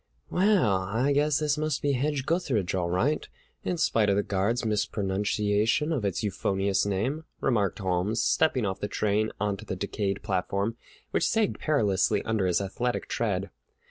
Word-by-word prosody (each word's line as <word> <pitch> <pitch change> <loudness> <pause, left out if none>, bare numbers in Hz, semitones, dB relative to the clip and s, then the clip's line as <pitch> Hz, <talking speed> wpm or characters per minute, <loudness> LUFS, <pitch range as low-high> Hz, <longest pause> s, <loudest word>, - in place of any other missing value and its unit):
"Well, 185 - +3
I 110 +9 0
guess 145 0 +2
this 150 -1 0
must 155 -2 -1
be 145 - +2
Hedge 140 +1 -1
gutheridge 135 - 0
all 90 -2 0
right, 120 - 0 0.3
in 180 - -1
spite 110 -9 +2
of 100 - +3
the 100 - +2
guard's 105 +5 0
mispronunciation 105 +5 0
of 135 -8 -1
its 100 -1 -1
euphonious 100 0 0
name," 125 +11 -1
remarked 105 -8 +1
Holmes, 95 +3 0
stepping 130 -3 +2
off 95 -1 -2
the 105 - -2
train 105 +1 0
onto 100 -1 -1
the - - -4
decayed 100 +1 -2
platform, 100 +2 -1 0.4
which - - +2
sagged 220 -2 +1
perilously 105 - +2
under 110 -4 0
his 90 +1 +2
athletic 120 +6 -2
tread. 100 -5 -1
105 Hz, 160 wpm, -27 LUFS, 100-140 Hz, 0.4 s, Well